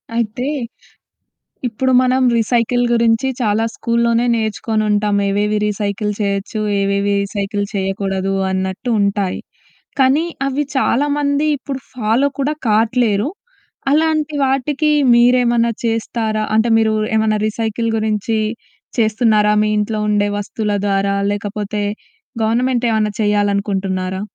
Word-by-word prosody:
అయితే, 235 +2 -2 1.2
ఇప్పుడు 260 +3 -1
మనం 255 +1 +2
రీసైకిల్ 240 +2 +1
గురించి 230 +2 +2
చాలా 220 -1 +1
స్కూల్‌లోనే 235 0 +1
నేర్చుకొనుంటాం 215 -2 0
ఏవేవి 210 +1 0
రీసైకిల్ 210 0 -2
చెయొచ్చు, 200 +1 -2 0.2
ఏవేవి 200 +1 0
రీసైకిల్ 200 0 -3
చెయ్యకూడదు 195 0 -1 0.2
అన్నట్టు 190 +5 -2
ఉంటాయి, 200 -2 0 0.6
కానీ 270 +5 +3 0.2
అవి 275 +2 -1
చాలామంది 285 +2 +1
ఇప్పుడు 270 0 -6
ఫాలో 245 +3 +1
కూడా 280 +2 0
కాట్లేరు. 220 +1 +2 0.6
అలాంటి 310 -1 +1
వాటికి 280 +3 0 0.2
మీరేమన్నా 240 -1 +3
చేస్తారా? 225 -1 -1
అంటే, 220 +2 +3
మీరూ 220 -1 +2 0.2
ఏమన్నా 220 -1 +2
రీసైకిల్ 225 +1 -2
గురించి 220 0 -1 0.6
చేస్తున్నారా 215 -1 +3
మీ - - +1
ఇంట్లో 215 +1 -1
ఉండే 205 0 +2
వస్తువుల 210 +1 -3
ద్వారా? 200 0 +1 0.2
లేకపోతే 205 0 -3 0.6
గవర్నమెంటేవన్నా 230 -2 +1
చెయ్యాలనుకుంటున్నారా? 200 -2 0
220 Hz, 100 wpm, -18 LUFS, 205-245 Hz, 1.2 s, కానీ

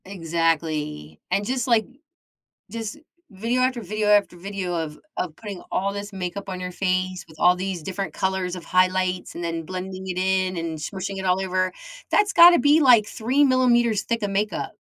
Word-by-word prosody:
Exactly, 160 - -2
and 200 - 0
just, 255 +2 -1
like 230 -3 +3 0.9
just 225 +3 -5 0.3
video, 230 +6 -1
after 255 -1 +1
video, 215 -1 -2
after 205 -3 +3
video 185 0 -4
of 160 -3 -4 0.2
of 170 -4 -3
putting 205 -4 -8
all 195 +1 0
this 205 +1 -6
makeup 195 +1 -5
on 185 -1 -5
your 180 0 -4
face, 185 0 -1
with 155 -1 -16
all 180 0 +5
these 185 -2 -4
different 195 +3 -4
colors 190 -1 -1
of 180 -2 -8
highlights, 185 0 +1
and 175 - -6
then 165 -1 -3
blending 185 +2 -6
it 180 -1 -3
in, 185 0 +1
and 165 -1 -4
smooshing 190 +5 -5
it 190 - -5
all 185 0 +2
over, 185 -1 0 0.4
that's 415 -1 +3
gotta 345 0 +8
be, 295 +2 +4
like, 245 -7 +6
3 250 +8 0
millimeters 240 -4 +3
thick 230 -1 -2
of 205 - -1
makeup. 205 +2 -2
190 Hz, 180 wpm, -23 LUFS, 180-215 Hz, 0.9 s, gotta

